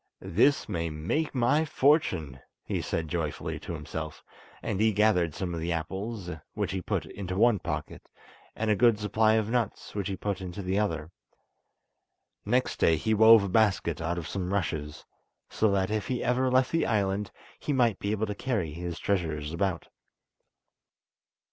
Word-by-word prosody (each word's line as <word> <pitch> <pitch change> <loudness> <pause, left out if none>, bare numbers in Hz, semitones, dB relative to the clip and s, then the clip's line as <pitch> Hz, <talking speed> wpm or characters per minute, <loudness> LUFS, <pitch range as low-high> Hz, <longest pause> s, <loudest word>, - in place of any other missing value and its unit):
"This 135 +10 +4
may 85 -5 -2
make 85 - -2
my 130 +5 +3
fortune," 115 - +2 0.2
he - - -2
said 80 -1 -2
joyfully 75 -2 -3
to - - -6
himself; 75 0 -6 0.4
and 95 - -2
he 110 0 +4
gathered 95 -6 +2
some 90 -2 -3
of 85 - -3
the 85 +2 -2
apples, 95 +5 -4 0.3
which - - -1
he 95 -1 -2
put - - -2
into 95 -2 -5
one 115 -1 +4
pocket, - - -5 0.5
and 110 0 0
a - - +4
good 115 0 +4
supply 110 +1 +2
of 110 0 +1
nuts 120 -4 -2
which 100 -3 -2
he 95 - -3
put 100 -2 -3
into 95 +2 -6
the 95 +2 0
other. 80 -6 -2 1.3
Next 125 +5 +1
day 80 - +4
he 110 +8 0
wove 110 0 +8
a 100 - -2
basket 100 -6 +2
out 85 +1 -1
of 85 - -4
some 95 -2 -3
rushes, 80 -6 -2 0.5
so 110 - +2
that 95 0 +1
if 110 -1 -1
he 125 -2 -2
ever 130 +1 +2
left 130 0 +3
the 165 - +1
island 100 -2 0 0.3
he - - -3
might 120 -7 +2
be 100 - -3
able 110 0 0
to 105 - -3
carry 100 - -2
his 85 +2 -5
treasures 80 -6 -1
about. 90 -1 -1
100 Hz, 175 wpm, -28 LUFS, 85-110 Hz, 1.3 s, wove